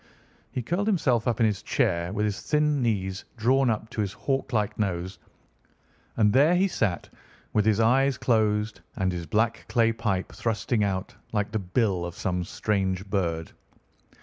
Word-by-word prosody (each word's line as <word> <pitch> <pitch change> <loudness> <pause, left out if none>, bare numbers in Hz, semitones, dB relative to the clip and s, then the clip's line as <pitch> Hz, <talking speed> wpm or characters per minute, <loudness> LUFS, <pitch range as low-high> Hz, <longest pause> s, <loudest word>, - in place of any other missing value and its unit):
He 125 - -3
curled 180 - -1
himself 130 - +2
up 120 -3 0
in - - +6
his 105 -3 0
chair, 85 +1 0
with 105 +1 0
his 105 -2 -2
thin 150 -2 +1
knees 95 -5 -1
drawn 130 +3 +3
up 110 -1 -1
to 110 - -2
his 100 -1 -2
hawk 135 +5 -2
like 105 -2 -1
nose, 95 -2 -2 1.0
and 105 -2 +4
there 145 +7 +5
he 190 +2 +3
sat 105 - -1 0.5
with 105 0 +2
his 110 -1 +3
eyes 130 +4 +3
closed 110 -3 +1
and 95 -1 0
his 85 -2 -5
black 110 +2 0
clay 115 -1 +3
pipe 95 -4 -2
thrusting 110 0 -1
out 95 -1 -2 0.2
like 105 -1 0
the 110 - -1
bill 95 -1 0
of 85 0 -5
some 90 -1 -1
strange 95 0 -1
bird. 85 -5 -1
105 Hz, 170 wpm, -26 LUFS, 95-120 Hz, 1.0 s, in